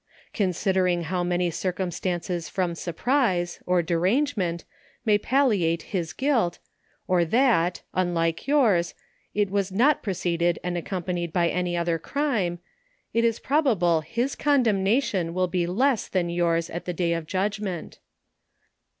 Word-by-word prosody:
Consider 190 -1 +1
ing 175 -1 0
how 180 +2 -1
many 175 0 0
circumstances 180 -1 -3
from 180 -3 -1
surprise, 180 - 0
or 180 -1 +3
derange 185 - +1
ment, 170 -4 -2 0.4
may 210 -2 +4
palliate 210 -11 +2
his 170 -4 -1
guilt, 260 -10 +1 0.5
or 180 -2 +3
that 180 -3 +2
(unlike 170 -1 0
yours) 220 -12 +3 0.4
it 205 -2 +1
was 200 -1 0
not 255 +10 +3
preceded 175 -3 0
and 180 0 -2
accompanied 175 -1 -3
by 170 0 +2
any 180 -1 -1
other 170 -1 0
crime, 215 - -1 0.6
it 230 - +2
is 230 -1 +2
probable 220 - +2
his 235 - -2
condemnation 210 - +1
will 185 0 +2
be 175 -1 -1
less 240 +6 +1
than 175 -2 -1
yours 170 -1 +1
at 170 - -5
the 180 - -3
day 170 0 0
of 165 -2 -4
judgment. 195 -2 -3
180 Hz, 135 wpm, -25 LUFS, 170-215 Hz, 0.6 s, may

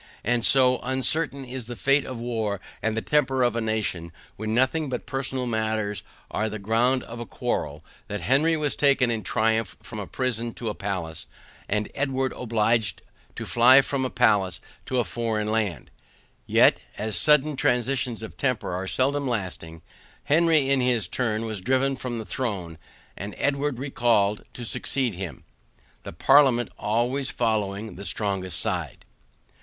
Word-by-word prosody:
And 120 +1 +1
so 130 0 +5
uncertain 135 +2 -1
is 125 -2 -7
the 120 - -6
fate 140 +3 +2
of 130 - -6
war 110 -4 -2 0.2
and 110 0 -1
the 115 - -1
temper 135 -3 +2
of 120 -2 +2
a 115 - 0
nation, 105 -7 -2 0.2
when 110 +1 -4
nothing 135 +4 +1
but 125 -2 -4
personal 135 -1 -2
matters 110 -3 -1 0.3
are 110 +1 -1
the 110 - -5
ground 115 +5 +2
of 115 +1 -9
a 120 - -5
quarrel, 75 +2 -3 0.2
that 105 -2 -4
Henry 150 - +3
was 150 -2 -1
taken 140 -4 +3
in 115 -1 -2
triumph 110 -1 0
from - - -7
a - - -5
prison 120 -2 -2
to 115 - -4
a - - -2
palace, 90 -6 -5 0.4
and 105 +1 0
Edward 135 -2 -1
obliged 115 -3 0 0.3
to - - -5
fly 125 +3 +7
from 135 0 -2
a 130 - -1
palace 100 -8 +2 0.3
to 130 - -1
a 120 - +3
foreign 110 -2 -2
land; 105 -6 -2 0.6
yet, - - +5 0.2
as 110 0 -1
sudden 150 - +4
transitions 125 -2 0
of 110 - -8
temper 125 -9 -1
are 95 +2 -3
seldom 140 +5 +1
lasting, 90 -8 -4 0.4
Henry 160 -2 +4
in 135 -1 +3
his 125 -3 +1
turn 115 -3 -1
was 110 -4 -4
driven 130 +5 +1
from 125 -2 -4
the 110 - -5
throne, 95 - -4 0.4
and 100 +2 -7
Edward 145 -2 0
recalled 115 -6 +1
to 120 - -6
succeed 130 +1 -1
him. 90 -3 -7 0.6
The - - -8
parliament 130 - +4
always 120 +6 0
following 110 -3 -1
the 100 - -7
strongest 95 -4 -1
side. 90 - -2
120 Hz, 160 wpm, -25 LUFS, 105-130 Hz, 0.6 s, fly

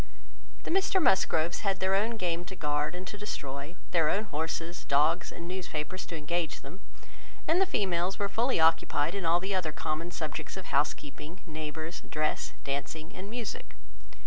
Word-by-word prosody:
The - - -3
Mr 380 +1 +4
Musgroves 175 - +3
had 195 -2 +1
their 190 0 +2
own 220 +4 +2
game 175 -3 0
to 190 - -7
guard, 150 0 0
and 180 +1 -5
to 205 +2 -6
destroy, 140 -5 -4 0.2
their 165 -3 +4
own 205 - +2
horses, 165 -1 -3
dogs, 155 +5 +3
and 170 - -7
newspapers 180 -1 -3
to 170 - -4
engage 160 +1 -1
them, 155 +8 -10 0.7
and 340 +4 +5
the 385 - +5
females 185 - +1
were 200 - +1
fully 235 +2 +2
occupied 160 -1 +4
in 195 -4 -1
all 170 +1 +5
the 190 +2 -2
other 180 -5 +1
common 155 +2 -2
subjects 165 +2 -4
of 190 - -6
housekeeping, 150 +3 -1
neighbours, 155 +1 -4
dress, 150 -7 0
dancing, 140 +4 -3
and 195 +2 -6
music. 220 - -5
170 Hz, 170 wpm, -31 LUFS, 155-190 Hz, 0.7 s, and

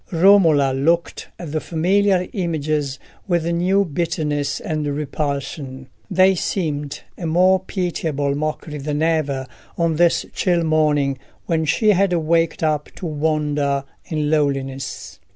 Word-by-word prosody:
Romola 165 -7 +5
looked 165 +6 0
at 170 -4 -7
the 155 0 -1
familiar 185 +2 +1
images 155 -6 -1 0.3
with 170 -3 +1
new 180 +4 +2
bitterness 150 -3 -2
and 155 -2 -3
repulsion: 140 -2 -4 0.2
they 190 0 +5
seemed 150 -6 -2 0.2
a 170 - -3
more 185 +3 +4
pitiable 160 -7 -2
mockery 150 +1 -3
than 150 +2 -2
ever 150 -5 0 0.3
on 165 -2 +1
this 170 0 +3
chill 175 -2 +1
morning, 150 -4 +1 0.3
when 160 -2 0
she 215 +8 +2
had 195 -1 +3
waked 165 0 +1
up 150 -2 0
to - - -7
wander 150 -3 0 0.2
in 150 -2 -1
loneliness. 135 -3 -2
155 Hz, 125 wpm, -21 LUFS, 145-170 Hz, 0.3 s, Romola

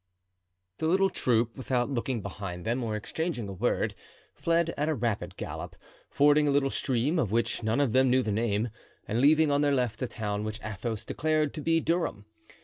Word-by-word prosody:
The 160 - 0
little 190 +3 +3
troop, 115 -1 +1
without 130 0 -1
looking 120 -3 -2
behind 95 -3 -6
them 120 +3 0
or 110 -2 -2
exchanging 120 - -3
a 100 - -6
word, 110 +7 0 0.4
fled 170 0 +1
at 150 +2 0
a 155 - +1
rapid 115 -4 -2
gallop, - - -6 0.3
fording 150 +1 +4
a - - +3
little 140 -1 +2
stream, 135 +6 0
of 110 -10 0
which 115 +1 0
none 110 +3 0
of 135 -6 +2
them 130 0 +4
knew 130 +1 +3
the 110 - -1
name, 110 +1 0 0.4
and 115 +3 0
leaving 155 +2 +5
on 145 0 +2
their 145 -1 +3
left 120 -4 -1
a 130 - 0
town 105 -3 -3
which 110 0 -4
Athos 110 +1 -4
declared 155 -1 0
to 155 - -5
be 165 +2 +2
Durham. 165 - -1
125 Hz, 195 wpm, -28 LUFS, 110-150 Hz, 0.4 s, leaving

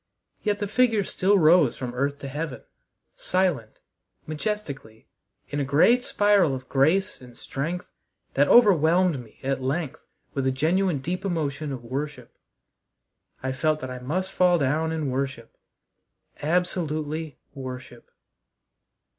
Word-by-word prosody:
Yet 210 -1 0
the 205 - -2
figures 220 -2 +2
still 200 +2 +3
rose 160 -5 +5
from 125 -2 -5
earth 140 +3 -1
to 140 - -5
heaven, 145 0 -5 0.5
silent, 175 -12 -1 0.4
majestically, 155 - -5 0.4
in 145 - -2
a - - +1
great 160 - +4
spiral 205 - +3
of 130 0 -8
grace 165 +9 +2
and 125 -1 -14
strength 165 +9 -4 0.5
that - - +3
overwhelmed 180 - +5
me 110 - -20
at 135 0 -1
length 140 +3 -3 0.3
with 135 -1 -1
a - - +3
genuine 165 +3 +1
deep 180 +6 -3
emotion 155 -5 -2
of 130 -3 -6
worship. 135 0 -5 1.1
I 130 - -1
felt 155 +3 0
that 130 - -5
I 125 - -6
must 180 +9 -2
fall 180 -1 +4
down 155 +2 0
and 155 -4 -2
worship 130 -3 -4 0.9
absolutely 155 -2 -1 0.2
worship. 130 -2 -8
155 Hz, 130 wpm, -25 LUFS, 135-180 Hz, 1.1 s, rose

